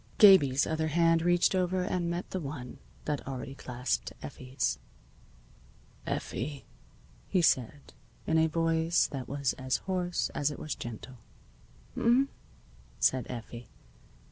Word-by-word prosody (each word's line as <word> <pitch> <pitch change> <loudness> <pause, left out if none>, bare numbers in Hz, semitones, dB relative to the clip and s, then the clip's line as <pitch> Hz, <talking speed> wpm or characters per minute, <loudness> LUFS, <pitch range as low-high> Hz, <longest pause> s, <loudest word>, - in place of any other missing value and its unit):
Gabie's 145 -10 +7
other 160 0 -1
hand 165 +1 +3
reached 175 +2 +3
over 185 0 +1
and 180 -2 -1
met 170 +2 -3
the 190 - -2
one 140 -5 -7 0.3
that 150 -3 -3
already 135 0 -5
clasped 125 -1 -3
Effie's. 130 -1 -2 1.3
"Effie," 140 +3 -3 0.6
he 185 -3 +2
said, 135 -1 +1 0.3
in 160 0 +3
a 160 - +4
voice 165 0 +2
that 135 -3 -5
was 140 -2 -1
as 130 -1 0
hoarse 180 -2 -1
as 145 - 0
it 145 - -6
was 150 - -4
gentle. 120 +2 -8 0.8
"H'm?" 255 +4 +3 0.7
said 130 -1 +2
Effie. 120 -1 -7
155 Hz, 125 wpm, -30 LUFS, 130-175 Hz, 1.3 s, Gabie's